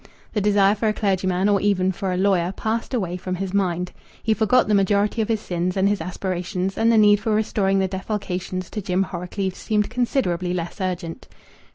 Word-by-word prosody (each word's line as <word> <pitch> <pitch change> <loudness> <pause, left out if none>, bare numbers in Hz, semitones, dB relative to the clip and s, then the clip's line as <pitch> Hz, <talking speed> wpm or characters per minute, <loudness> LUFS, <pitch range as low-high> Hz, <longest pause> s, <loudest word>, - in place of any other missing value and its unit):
The 210 - 0
desire 200 -1 +4
for 215 +1 -1
a 215 - +2
clergyman, 190 -2 +1
or 205 -1 +3
even 190 -2 +2
for 190 +1 -3
a 180 - -1
lawyer, 185 -2 +2
passed 225 +3 -2
away 185 -8 -1
from 185 0 -4
his 190 +1 -4
mind; 180 -3 0 0.3
he 220 - +3
forgot 220 +4 +3
the 210 - +2
majority 200 +2 +2
of 215 - -1
his 225 -2 0
sins 180 +1 -2
and 190 +1 +3
his 205 0 0
aspirations, 185 +1 -3
and 225 +1 +3
the 230 - +4
need 205 -1 +6
for 220 0 0
restoring 200 -2 +1
the 190 -1 +2
defalcations 185 -2 -4
to 210 - -3
Jim 185 0 +1
Horrocleave 185 +1 -4
seemed 210 +2 -1
considerably 185 - 0
less 175 +3 -5
urgent. 180 +2 -4
195 Hz, 200 wpm, -23 LUFS, 180-210 Hz, 0.3 s, need